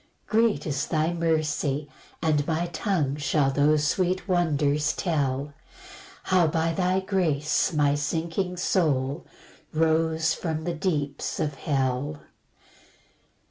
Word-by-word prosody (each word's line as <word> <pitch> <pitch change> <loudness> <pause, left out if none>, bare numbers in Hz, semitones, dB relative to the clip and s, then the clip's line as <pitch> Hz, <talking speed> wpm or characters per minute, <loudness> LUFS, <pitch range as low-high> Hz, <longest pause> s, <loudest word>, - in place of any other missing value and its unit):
4 220 - +1
Great 230 -4 +1
is 140 -4 -2
thy 160 +1 0
mercy, 155 -3 0 0.4
and 150 -3 +1
my 165 +1 0
tongue 165 -4 -1
Shall 145 -1 +1
those 145 +2 +3
sweet 185 +5 0
wonders 150 -5 +1
tell, 145 -5 -1 0.7
How 185 -3 +3
by 165 +1 0
thy 185 +2 +1
grace 165 -7 +1
my 145 -3 +2
sinking 165 +5 -2
soul 150 -5 0 0.4
Rose 160 0 +2
from 160 -2 -3
the 175 - -2
deeps 150 -5 -2
of 150 - -1
hell. 135 +1 -1
155 Hz, 115 wpm, -26 LUFS, 145-175 Hz, 0.7 s, those